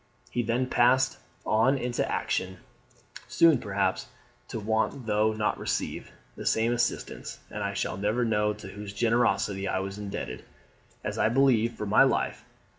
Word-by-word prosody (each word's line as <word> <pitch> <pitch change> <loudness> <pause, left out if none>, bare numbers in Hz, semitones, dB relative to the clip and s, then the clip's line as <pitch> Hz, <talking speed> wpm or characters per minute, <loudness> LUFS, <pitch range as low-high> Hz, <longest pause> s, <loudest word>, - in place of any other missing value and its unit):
He 120 - 0
then 120 +2 0
passed 130 +1 +3 0.3
on 115 +6 +3
into 120 -1 -1
action 95 0 -1 0.7
soon, 165 -6 +5
perhaps, 100 -2 -1 0.4
to 115 - -5
want, 110 +4 -1
though 105 0 +2
not 105 -1 -1
receive, - - -3 0.2
the - - -7
same 115 +2 +2
assistance; 120 0 -2
and - - -5
I - - -2
shall - - -2
never 105 +5 0
know 105 -2 +2
to 105 -2 -8
whose 100 0 -8
generosity 105 -3 +1
I 95 - 0
was 95 +1 -4
indebted, 100 -1 -5 0.6
as - - -3
I 110 - +3
believe, 120 -2 +3
for 105 - -5
my 100 - +4
life. - - +2
110 Hz, 155 wpm, -28 LUFS, 100-120 Hz, 0.7 s, soon